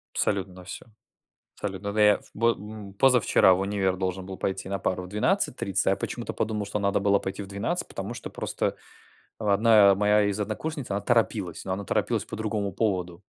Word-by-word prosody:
Абсолютно 95 -2 0
на 90 0 -12
всё, 95 - -8 0.7
абсолютно. 100 0 -4
Да 105 - +2
я 105 -1 +6
бо 115 +2 +2
м, 105 -1 -9
позавчера 125 -5 +5
в 90 - 0
универ 95 -1 0
должен 95 0 -3
был 95 0 -7
пойти 95 0 -3
на 100 0 -2
пару 90 +1 -1
в - - -8
12:30, 105 +3 0
а - - +6
я - - +2
почему-то - - -4
подумал, 105 -1 -2
что 100 +1 -3
надо 100 0 +1
было 100 0 +3
пойти 95 +2 -5
в - - -10
12:00, 100 0 -2
потому - - -5
что - - -7
просто - - -2 0.6
1 105 -1 +5
моя 105 +1 +3
из 100 0 -1
однокурсниц, 125 +7 -4
она 100 +1 0
торопилась, 105 -6 0
но 95 - -2
она 100 +1 -3
торопилась - - 0
по - - -7
другому 105 -2 -2
поводу. 90 -3 -1
100 Hz, 195 wpm, -26 LUFS, 95-105 Hz, 0.7 s, я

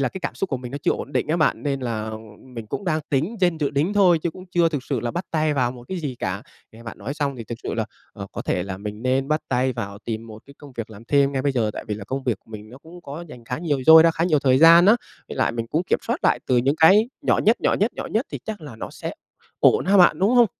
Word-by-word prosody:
là 135 - +1
cái 190 - -8
cảm - - -4
xúc 195 - -3
của 135 - 0
mình 125 0 -8
nó 140 - -4
chưa - - +2
ổn 140 - -6
định - - -1
á 160 - +1
bạn, 155 - +1
nên 140 -2 -2
là, 115 -4 -3
ờ, 110 0 -5 0.2
mình 120 -4 -9
cũng 195 - -5
đang 160 -3 0
tính 155 - 0
trên 175 -3 +2
dự 145 -2 0
đính 150 +7 0
thôi 185 -5 +4
chứ 165 +2 -2
cũng 185 +3 -12
chưa 175 -1 +2
thực 145 -5 -3
sự 135 -5 -2
là 120 0 -2
bắt 175 +2 -4
tay 155 -2 +1
vào 125 -3 +1
một 120 -1 -12
cái 190 -1 -3
gì 145 -5 -4
cả. 95 +2 -3 0.3
Nghe 115 - -14
bạn 115 - -9
nói 115 +8 -5
xong 140 -3 -2
thì 115 - -7
thực 115 +1 -7
sự - - -3
là, 110 -1 -1 0.3
ờ, 100 -2 -8
có - - -5
thể 90 - -1
là 95 0 -5
mình 105 +2 -7
nên 130 +2 0
bắt 155 0 +1
tay 130 0 +1
vào 100 -4 -6
tìm 110 0 -5
một 110 0 -11
cái 140 - -15
công 145 -2 -13
việc 115 -2 -6
làm 110 +1 -12
thêm 140 +2 +2
ngay 135 -1 -1
bây 140 0 +1
giờ. 115 -4 0
Tại - - -7
vì 105 - -1
là 105 -1 -8
công 135 +4 -4
việc 120 -6 0
của - - -25
mình 105 -1 -9
nó 125 - -12
cũng 165 +4 -14
có 155 +4 -7
rảnh 125 -5 -12
khá 125 +4 -4
nhiều, 145 -6 -1
dôi 160 0 +10
ra 165 - +5
khá 165 +1 -1
nhiều 155 -4 +3
thời 130 -2 +3
gian 170 +3 +8
á, 220 +3 +7 0.3
với - - -7
lại - - +1
mình 115 -1 -3
cũng 155 +8 -1
kiểm - - +1
soát - - 0
lại - - +3
từ 125 - +2
những 135 +5 +2
cái 200 +9 +6
nhỏ - - +2
nhất, 225 +3 +3
nhỏ - - +2
nhất, 215 +5 0
nhỏ - - -5
nhất 225 +6 -1
thì - - -3
chắc 215 -4 -5
là 145 -7 -10
nó - - -7
sẽ - - -6 0.5
ổn - - +4
ha 200 +1 +4
bạn, 180 - +6
đúng 195 +3 +3
hông? 240 -2 +6
140 Hz, 320 wpm, -23 LUFS, 115-165 Hz, 0.5 s, dôi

